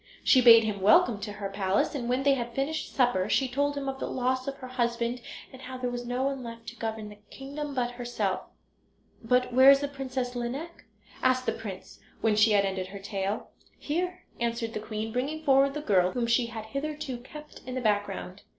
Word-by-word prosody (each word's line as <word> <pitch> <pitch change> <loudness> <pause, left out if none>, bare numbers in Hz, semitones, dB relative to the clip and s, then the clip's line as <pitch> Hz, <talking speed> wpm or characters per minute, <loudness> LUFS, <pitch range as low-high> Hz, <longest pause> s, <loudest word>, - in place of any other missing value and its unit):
She 260 - +6
bade 230 -2 +9
him 210 -3 -2
welcome 215 +2 +5
to 205 0 -5
her 205 -1 -4
palace, 195 0 0
and 245 -5 -3
when 255 +2 +1
they 280 0 +5
had 240 -3 -3
finished 285 +4 -2
supper 240 -7 +2
she 270 - +2
told 285 +3 0
him 275 -1 -3
of 270 0 -3
the - - -3
loss 255 +1 -1
of 275 - -2
her 255 - -8
husband, 240 -1 -1 0.3
and 260 - -11
how 260 0 -7
there 250 -1 -2
was 245 0 -5
no 250 +2 -1
one 275 -1 -1
left 230 -1 -8
to 240 - -12
govern 220 -2 -4
the 210 0 -13
kingdom 285 +1 -6
but 245 -1 0
herself. 240 -6 -2 0.8
"But 250 +2 +2
where 260 +2 +8
is 275 0 +7
the 285 - -1
Princess 260 -3 -4
Lineik?" 270 +8 -5 0.4
asked 255 0 +2
the 225 - +2
prince 205 -5 -8 0.2
when 220 -2 +2
she 215 +1 +5
had 200 -1 +4
ended 190 -1 -2
her 200 +1 -8
tale. 200 +1 -3 0.3
"Here," 360 +4 -3 0.2
answered 235 -1 -2
the - - -3
queen, 220 +1 -4
bringing 290 +6 -2
forward 275 0 +4
the 300 - -3
girl, 185 -8 +2
whom 245 -2 0
she 235 +1 +2
had 225 -2 -7
hitherto 275 +1 -4
kept 300 +4 -12
in 255 - -4
the - - -1
background. 205 -3 -1
245 Hz, 215 wpm, -28 LUFS, 220-270 Hz, 0.8 s, bade